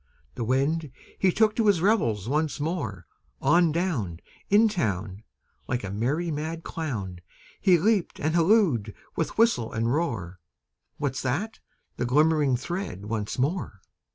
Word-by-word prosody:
The 120 - -4
Wind, 140 +5 0 0.3
he 190 - +4
took 215 +2 +3
to 225 -2 +2
his 200 -5 +4
revels 120 - +1
once 150 +3 0
more; 135 - -3 0.3
On 170 -2 +4
down 145 - -1 0.3
In 210 +3 +6
town, 100 - -2 0.5
Like 120 - -2
a 95 - -4
merry 140 - -1
mad 160 +2 -4
clown, 105 - -4 0.4
He 185 -3 +5
leaped 200 +1 +1
and 155 +2 0
hallooed 165 - +3 0.2
with 165 - -2
whistle 225 - +3
and 115 +2 0
roar, 110 - -2 0.6
"What's 140 -2 -2
that?" 160 - -2 0.4
The 120 - -1
glimmering 150 -1 +3
thread 150 - -5
once 105 -1 -3
more! 135 - -1
150 Hz, 140 wpm, -26 LUFS, 115-175 Hz, 0.6 s, In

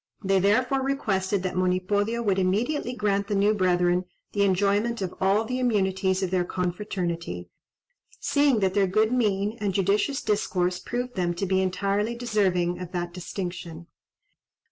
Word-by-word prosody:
They 195 0 +3
therefore 250 +8 +2
requested 200 -8 0
that 185 - -2
Monipodio 200 +5 0
would 195 -3 +1
immediately 230 +9 0
grant 200 -3 0
the 205 - -1
new 205 +2 +3
brethren 180 -2 +2 0.3
the 205 - 0
enjoyment 200 +4 +2
of 180 - -4
all 200 +4 +3
the 250 +3 -2
immunities 190 -5 +1
of 185 - -2
their 185 -1 +2
confraternity, 175 - -3 0.7
seeing 285 -6 +2
that 190 -1 +2
their 200 -1 +3
good 215 +4 +2
mien 210 -2 0
and 200 -3 -1
judicious 205 +9 +1
discourse 185 -4 0
proved 245 +1 -4
them 175 -4 -1
to 195 - -2
be 190 0 +1
entirely 200 +4 0
deserving 190 -7 0
of 180 0 -7
that 175 -1 -3
distinction. 175 -2 -6
195 Hz, 150 wpm, -26 LUFS, 185-215 Hz, 0.7 s, They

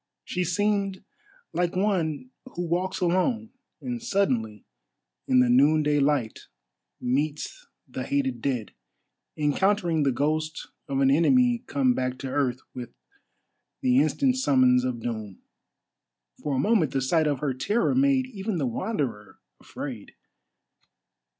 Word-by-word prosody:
She 180 - -2
seemed 200 +1 0 0.5
like 175 0 0
one 185 - -1 0.2
who 175 - -2
walks 180 +3 -1
alone, 185 +6 +1 0.3
and 245 -2 -4
suddenly, 125 - -1 0.6
in 125 -1 +5
the 125 - +3
noonday 145 +4 +4
light, 140 -6 0 0.5
meets 150 - -2 0.2
the - - -6
hated 280 -2 -1
dead; 125 -6 -2 0.6
encountering 170 +2 +1
the 140 -2 +2
ghost 155 +4 -2 0.2
of 135 0 -1
an 135 0 +4
enemy 245 - +3
come 260 -3 +2
back 130 - -2
to 135 0 -6
earth 130 -3 0
with 120 -2 -8 0.9
the 255 0 +4
instant 270 -2 +2
summons 130 - +4
of 125 -2 -2
doom. 110 -4 -5 1.0
For 145 -2 -1
a - - 0
moment 180 0 +2
the 135 - +1
sight 155 +4 +2
of 145 -2 +1
her 145 -3 0
terror 210 - 0
made 265 0 +3
even 215 -4 -4
the 145 - 0
Wanderer 120 - -3 0.2
afraid. - - -8
155 Hz, 130 wpm, -26 LUFS, 130-210 Hz, 1.0 s, in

